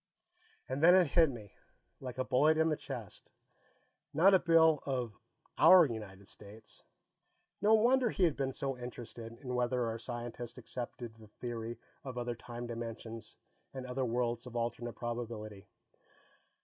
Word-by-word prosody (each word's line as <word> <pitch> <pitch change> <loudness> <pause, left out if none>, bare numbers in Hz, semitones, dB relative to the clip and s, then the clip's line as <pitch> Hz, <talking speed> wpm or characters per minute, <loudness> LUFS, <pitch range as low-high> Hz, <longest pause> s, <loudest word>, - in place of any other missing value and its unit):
And 130 +2 -3
then 175 +3 +8
it 185 -1 +6
hit 165 -1 +5
me, 110 -6 -9 0.5
like 130 -2 -7
a 130 - +1
bullet 140 +5 +3
in 160 0 +3
the 155 - +1
chest. - - -8 0.9
Not 185 +6 +6
a 190 - +7
bill 160 -3 +5
of 125 -5 -2 0.5
our 185 -2 +9
United 105 -6 -7
States. 105 +1 -14 0.8
No 215 +2 +6
wonder 245 +2 +4
he 195 - 0
had 165 -4 +3
been 135 -1 -1
so 135 0 -3
interested 120 -2 -8
in 125 -3 -5
whether 125 0 +1
our 115 0 -3
scientists 120 0 -6
accepted 120 -1 -6
the 110 -1 -16
theory 115 +1 -6 0.3
of 130 -2 -7
other 120 0 -2
time 120 +1 -8
dimensions 115 -1 -7 0.4
and 130 -1 -5
other 130 +1 -2
worlds 120 0 -1
of 120 - -10
alternate 120 0 -2
probability! 110 -4 -5
120 Hz, 150 wpm, -33 LUFS, 115-140 Hz, 0.9 s, our